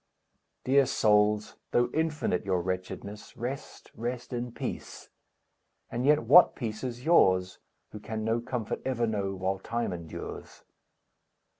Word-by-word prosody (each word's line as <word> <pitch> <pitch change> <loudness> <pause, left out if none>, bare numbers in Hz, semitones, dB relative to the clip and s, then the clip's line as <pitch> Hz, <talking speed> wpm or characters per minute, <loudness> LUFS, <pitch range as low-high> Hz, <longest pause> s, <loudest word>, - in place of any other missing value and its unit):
Dear 135 0 +4
souls, 105 -1 +2
though 120 0 +2
infinite 155 - 0
your 95 -2 +1
wretchedness, 95 +4 -5
Rest, 125 +4 -6
rest 120 +2 -5
in 120 0 -3
peace! - - -6 0.8
And 125 +3 -1
yet 150 +1 +5
what 180 - +7
peace 110 -3 -5
is 125 -1 -5
yours, 95 - +4 0.3
Who 105 - -8
can 110 +1 -5
no 115 +2 +1
comfort 120 -2 -3
ever 120 -3 0
know 100 -3 -2
While 95 +1 -1
Time 115 -1 -2
endures! 85 -2 -8
115 Hz, 130 wpm, -29 LUFS, 100-125 Hz, 0.8 s, what